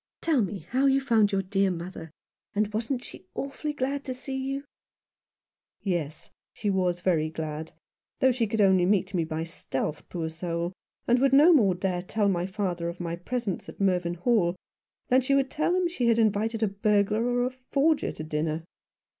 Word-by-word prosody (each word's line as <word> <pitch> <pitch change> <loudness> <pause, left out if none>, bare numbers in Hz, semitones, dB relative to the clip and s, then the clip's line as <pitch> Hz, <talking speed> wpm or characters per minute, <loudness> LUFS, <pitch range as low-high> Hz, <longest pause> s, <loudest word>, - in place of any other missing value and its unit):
Tell 310 -7 +2
me 195 -5 -3
how 265 +3 +3
you 270 0 +4
found 225 -6 +3
your 195 -1 +1
dear 195 +1 +1
mother 175 -1 -6 0.2
— - - -67
and 210 0 0
wasn't 235 +4 -2
she 185 - -12
awfully 280 +2 -3
glad 280 0 -2
to 260 -2 -3
see 265 +1 -6
you? 270 +1 -3 0.4
" - - -67
" - - -67
Yes, 165 -6 -3 0.2
she 205 - -1
was 180 -2 0
very 160 -4 +2
glad; 155 0 -5 0.5
though 260 - +5
she 235 -2 0
could 215 +1 0
only 190 -3 +5
meet 200 -1 +1
me 175 -3 +1
by 160 0 -3
stealth, 155 -3 -4
poor 165 -2 -3
soul, 170 +1 -3 0.3
and 245 +1 +4
would 270 0 +3
no 305 +6 +8
more 205 - +4
dare 180 -1 -1
tell 205 +2 0
my 180 -1 0
father 185 -4 -2
of 170 - -8
my 170 -1 -3
presence 205 +2 -3
at - - -12
Mervynhall 180 +1 +1 0.5
than 255 +1 +5
she 275 +2 +2
would 275 -1 +1
tell 325 +4 +1
him 365 -1 +2
she 265 -9 -1
had 230 -1 +4
invited 220 +1 +1
a - - +4
burglar 205 +2 +1
or 245 0 +1
a 255 - -1
forger 275 +4 +1
to 155 - -7
dinner. 155 +1 -2
205 Hz, 195 wpm, -27 LUFS, 175-255 Hz, 0.5 s, no